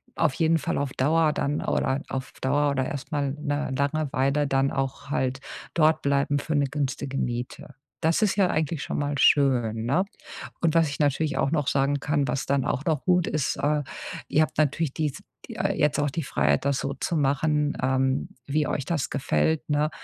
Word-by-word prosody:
auf 155 -5 +2
jeden 165 +2 +2
Fall - - -2
auf 140 -2 -1
Dauer 155 +3 +3
dann 145 0 -1
oder 135 +1 0
auf 130 0 -4
Dauer 145 +2 +2
oder 130 -2 0
erst 140 +4 -6
mal 140 -3 0
'ne 145 -2 -2
lange 145 +1 0
Weile 140 +2 +1
dann 135 0 +1
auch 135 0 -3
halt 130 -2 -1 0.3
dortbleiben 145 -3 +2
für 155 +2 -2
'ne 145 -1 +3
günstige 140 -1 -3
Miete. 120 -1 -4 0.3
Das 165 +3 +2
ist 210 -2 +2
ja 195 -2 +4
eigentlich 155 -1 -1
schon - - -3
mal 145 0 -1
schön, 120 -6 +3
ne? 165 +11 +2 0.6
Und 165 -2 +2
was 165 -1 +4
ich 140 - -6
natürlich 150 +1 +1
auch 135 - +1
noch 150 -4 0
sagen 140 +1 +1
kann, 145 -1 0
was 135 - -1
dann 140 -1 +1
auch 140 - -2
noch 155 -4 0
gut 180 -2 +3
ist, 150 -4 -1
äh, 150 0 +1 0.5
ihr 155 - +3
habt 155 - -5
natürlich 155 -1 +1
dies 150 -4 -2 0.3
äh, - - -1
jetzt 150 -1 +2
auch 145 0 +1
die 160 +4 -3
Freiheit, 70 - +1
das 140 -1 +1
so 140 - -2
zu 165 +4 -2
machen, 145 +1 +1
ähm, 130 +1 +1 0.2
wie 150 +2 0
euch 140 - -2
das 155 -5 -1
gefällt, 140 - 0
ne, 150 +1 +2
145 Hz, 195 wpm, -26 LUFS, 135-155 Hz, 0.6 s, ja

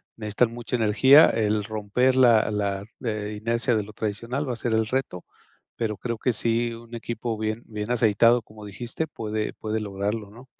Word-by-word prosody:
necesitan 110 +2 0
mucha 120 +1 -4
energía, 125 +7 +6
el 105 -1 +1
romper 110 +5 0
la 115 -5 +5
la 100 -1 -1 0.5
inercia 115 +3 0
de 110 - +1
lo 105 +1 -12
tradicional 115 +7 -3
va 125 - -1
a 120 - -6
ser 115 0 -2
el 110 0 +2
reto, 130 -7 -3 0.5
pero 110 -3 -2
creo 115 -1 -4
que 125 - +1
sí 115 +1 0
un 115 +1 -14
equipo 115 0 -4
bien 110 +1 -2
bien 105 0 -6
aceitado, 115 0 +4
como 105 0 -14
dijiste, 120 +9 -4
puede 110 -1 -4
puede 110 0 -3
lograrlo, 105 +1 -3
¿no? 120 +5 -14
110 Hz, 175 wpm, -25 LUFS, 105-120 Hz, 0.5 s, energía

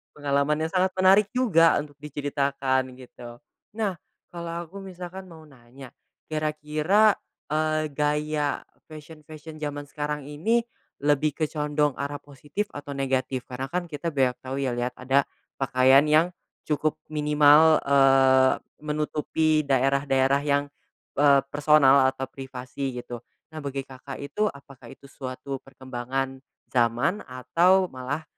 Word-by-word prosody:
Pengalaman 145 +1 0
yang 160 - -3
sangat 185 0 +1
menarik 190 +2 +5
juga 175 -10 +4
untuk 145 -1 -5
diceritakan 140 -2 -1
gitu. 120 -2 -12 0.4
Nah, 205 -6 -2 0.3
kalau 170 0 -5
aku 190 +4 -11
misalkan 185 0 -9
mau 160 -2 -13
nanya, 130 -2 -14 0.4
kira-kira, 155 +7 +2 0.3
eee, 155 0 0
gaya 150 0 -1 0.2
fashion-fashion 155 0 -11
zaman 145 -1 -4
sekarang 150 0 -4
ini 180 +12 0 0.4
lebih 145 0 +2
ke 155 -2 -2
condong 150 -2 0
arah 140 +1 -3
positif 145 +8 -5
atau 145 -1 -7
negatif? 130 -1 -1
Karena 130 +1 -6
kan 175 +2 -4
kita 150 +3 -4
banyak 130 -5 +1
tau 130 +1 -6
ya 135 -2 -1
lihat 120 +1 -3
ada 135 +2 +1 0.3
pakaian 135 +2 +4
yang 160 +4 +4 0.3
cukup 155 0 0 0.2
minimal, 150 +1 +5
eee, 135 -1 +5 0.3
menutupi 155 0 0
daerah-daerah 135 0 +2
yang, 145 0 +1 0.5
eee, 140 -2 +5
personal 145 -2 +5
atau 130 0 -3
privasi 130 0 -6
gitu, 120 -1 -7 0.3
nah 155 - -7
bagi 140 -1 -4
Kakak 135 +1 -9
itu 210 +9 -1
apakah 140 -2 -15
itu 140 +1 -15
suatu 130 +1 -6
perkembangan 130 0 -5 0.3
zaman 120 - +1
atau 170 +10 +2
malah 130 +5 -4
145 Hz, 125 wpm, -25 LUFS, 135-155 Hz, 0.5 s, menarik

